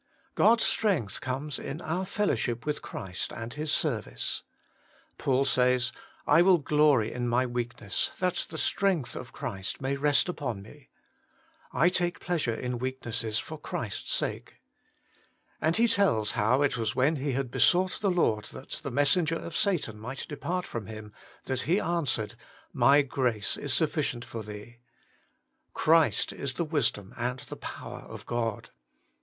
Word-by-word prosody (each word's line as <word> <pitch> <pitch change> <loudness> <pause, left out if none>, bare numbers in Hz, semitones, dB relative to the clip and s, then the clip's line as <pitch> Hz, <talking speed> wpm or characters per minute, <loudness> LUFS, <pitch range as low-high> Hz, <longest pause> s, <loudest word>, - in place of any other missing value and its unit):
God's 225 +1 +5
strength 180 - +1
conies 135 +2 -3
in 145 - -5
our 175 +3 -2
fellowship 120 - 0
zvith 150 0 -2
Christ 95 -1 -5
and 115 +1 -6
His 150 0 -2
service. 115 - -1 0.4
— - - -33
Paul 135 0 +2
says: 125 -2 +3 0.2
' - - -29
1 160 +4 +6
will 185 -1 +6
glory 145 -6 +3
in 120 0 -2
my 120 +2 +2
weakness, 120 -4 -2
that 180 -1 0
the 160 - -6
strength 185 -6 +1
of 125 - -7
Christ 95 -5 -4
may 135 0 -1
rest 145 +3 +3
upon 120 - -3
me.' 135 +6 -16 0.4
' - - -33
I - - +7
take 175 -1 0
pleasure 160 -10 -1
in 125 0 -3
weaknesses 120 -4 -2
for 155 +4 -4
Christ's 110 -8 -4
sake.' - - -2 1.1
And 160 +2 +2
he 235 +1 +5
tells 195 - +2
how 125 +7 +2
it 140 -3 +1
was 115 -1 -1
when 145 +5 +3
he 140 0 -1
had 130 -1 -2
besought 185 +5 +3
the 200 - +2
Lord 115 - +2
that 130 - -11
the - - -3
messenger 145 +5 +2
of 165 0 -6
Satan 170 - 0
might 125 +5 -6
depart 175 +5 -3
from 115 -4 -5
him, 110 -1 -9 0.3
that 130 -1 -1
He 180 - +5
an 170 -4 0
swered: 110 -4 0 0.3
' - - -29
My 145 +1 +5
grace 125 -6 0
is 145 - -3
sufficient 145 -4 +1
for 115 - -6
thee.' 105 +3 -10 0.5
* - - -47
Christ 160 0 +3
is 140 -2 -3
the 170 - -1
wisdom 125 - 0
and 125 +2 -1
the - - -8
power - - -7
of - - -10
God.' 115 -3 -2
135 Hz, 165 wpm, -29 LUFS, 120-160 Hz, 1.1 s, I